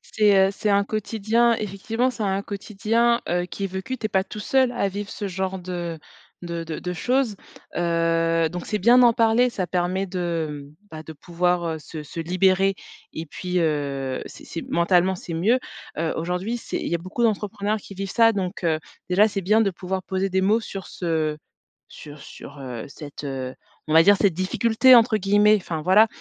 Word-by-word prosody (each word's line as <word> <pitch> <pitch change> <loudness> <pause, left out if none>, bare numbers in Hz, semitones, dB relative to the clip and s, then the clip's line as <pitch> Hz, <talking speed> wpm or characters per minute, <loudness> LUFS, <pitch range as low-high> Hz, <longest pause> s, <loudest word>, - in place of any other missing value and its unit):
C'est, 210 -2 +5
heu, - - -4
c'est 210 +1 -2
un 200 0 +4
quotidien, 220 +3 +1
effectivement 220 +5 -2
c'est 235 - -8
un 195 -1 0
quotidien, 220 +4 0
heu, 175 0 0
qui 200 - -7
est - - 0
vécu 190 +8 -5
tu 220 - -6
es - - 0
pas 190 -2 +2
tout 210 - -10
seul 260 +3 +2
à 240 -5 0
vivre 200 +1 -5
ce 205 - -5
genre 190 0 -3
de 175 -2 -5 0.5
de 170 -1 -4
de 160 -2 -5
de 180 - -4
choses, 245 +4 0 0.4
heu, 165 -1 +1
donc 175 0 -6
c'est 210 - -1
bien 235 +6 +5
d'en 240 -1 +7
parler 230 +2 +3
ça 195 -6 -3
permet 180 +2 -1
de, 165 -6 -3
mmh, - - -24 0.2
bah, 155 -1 -7
de 160 - -10
pouvoir, 175 +3 -1
heu, 160 -1 -3
se 155 0 -8
se 150 +3 -8
libérer 190 +3 +2 0.4
et 160 - -6
puis, 180 +3 -4
heu, 140 -5 -1
c'est - - -13
c'est 165 - -6
mentalement 180 +2 +3
c'est 175 -1 -8
mieux. 200 +10 +3 0.4
Heu, 160 +1 -1
aujourd'hui 180 +8 -2
c'est - - -5
il - - -4
y - - +2
beaucoup 185 +7 -4
d'entrepreneurs 210 -1 0
qui 195 - -12
vivent 195 0 -4
ça 230 -1 +4
donc 190 -2 -4
heu, 160 -2 +2 0.3
déjà 200 +4 +5
c'est 200 -2 -3
bien 210 +5 +3
de 200 -3 +1
pouvoir 185 +1 -4
poser 190 +1 -2
des 190 0 +1
mots 210 +4 +3
sur 195 -4 -7
ce 160 -3 -2 0.5
sur 145 0 -11
sur, 145 - -12
heu, 125 -4 -6
cette, 145 0 -10
heu, 130 -2 -4 0.3
on 155 - -1
va 160 - +8
dire 205 +3 +6
cette 195 -3 +2
«difficulté», 225 +8 +4
entre 230 -2 +5
guillemets, 205 +2 +4
enfin 165 -5 -5
voilà. 200 +6 +6
190 Hz, 200 wpm, -23 LUFS, 170-210 Hz, 0.5 s, va